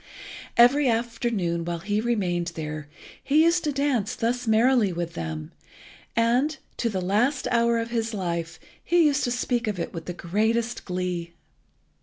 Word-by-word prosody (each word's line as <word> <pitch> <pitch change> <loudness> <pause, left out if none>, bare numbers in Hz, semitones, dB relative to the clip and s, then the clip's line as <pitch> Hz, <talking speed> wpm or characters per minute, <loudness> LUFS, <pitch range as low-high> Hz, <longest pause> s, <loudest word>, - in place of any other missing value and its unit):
Every 255 +3 +6
afternoon 230 -7 -1
while 170 0 -3
he 205 +5 -1
remained 180 -7 -1
there 155 -2 -5 0.4
he 300 +3 +4
used 335 +1 +3
to 300 - +1
dance 275 -7 0
thus 245 +1 -1
merrily 225 -1 +4
with 170 -1 -4
them, 80 -2 -5 0.6
and, 245 +7 +2 0.2
to 235 - 0
the 190 -4 -2
last 230 +10 +1
hour 235 -1 +3
of 230 0 -3
his 225 -1 -1
life, 170 -5 -3 0.2
he 345 -1 +4
used 290 -1 +2
to 245 - -1
speak 245 -1 -1
of 205 -4 -2
it 170 - -4
with 165 -1 -6
the 180 - -4
greatest 220 +7 -1
glee. 180 -2 -3
225 Hz, 160 wpm, -25 LUFS, 175-245 Hz, 0.6 s, Every